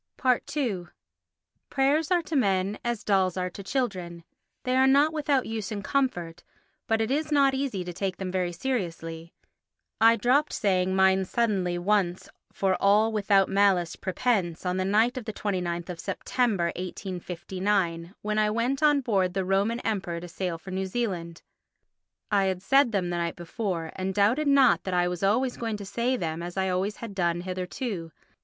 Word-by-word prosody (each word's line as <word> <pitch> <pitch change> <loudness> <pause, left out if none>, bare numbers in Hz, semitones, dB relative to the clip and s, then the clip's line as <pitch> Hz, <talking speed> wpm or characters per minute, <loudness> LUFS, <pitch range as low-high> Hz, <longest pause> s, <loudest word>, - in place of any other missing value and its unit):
ii 200 -11 -1 0.8
Prayers 285 +3 +2
are 355 -2 +2
to 320 - -4
men 195 -5 +1
as 240 -3 -2
dolls 190 -3 +2
are 180 0 -2
to 200 - -8
children. 185 -7 -3 0.4
They 255 0 0
are 260 +1 +5
not 285 +4 +4
without 290 -4 +1
use 220 -1 -4
and 205 -1 -4
comfort, 175 -12 -1 0.5
but 225 0 +2
it 220 +3 -1
is 305 +2 -1
not 280 -2 +4
easy 265 -9 -2
to 175 0 -6
take 190 0 -3
them 190 -1 -4
very 180 -1 -1
seriously. 170 -7 -4 0.7
I 230 +1 +6
dropped 255 +7 +2
saying 190 -2 +1
mine 190 0 +4
suddenly 190 -5 0
once 185 -1 0 0.2
for 190 -1 +1
all 210 +3 +4
without 200 -2 +3
malice 195 -4 +2
prepense, 185 -3 -1
on 180 0 0
the 185 - 0
night 220 +6 +2
of 235 - -11
the 220 - -4
29th 180 -4 -3
of 175 -2 -6
September, 205 -9 0
1859, 185 0 -3
when 210 0 0
I 215 0 +3
went 240 +6 0
on 295 -2 +4
board 195 -7 0
the 190 -1 0
Roman 200 +5 +1
Emperor 185 -6 -2
to 175 - -8
sail 175 0 -3
for 190 +4 -10
New 190 +1 -2
Zealand. 185 -6 -3 0.9
I 200 -2 +3
had 185 -1 -2
said 270 +2 +4
them 185 -4 -1
the 175 - -1
night 170 -1 -2
before 175 -2 -4
and 190 0 -3
doubted 230 +9 +3
not 280 -2 +5
that 185 -1 -1
I 175 0 +3
was 180 -1 -4
always 240 +6 +1
going 225 -2 -3
to 200 - -8
say 240 +5 0
them 165 -4 -3
as 175 +2 -6
I 190 0 +1
always 190 +3 -1
had 230 -3 -8
done 175 -2 0
hitherto. 185 0 -4
195 Hz, 175 wpm, -27 LUFS, 180-235 Hz, 0.9 s, I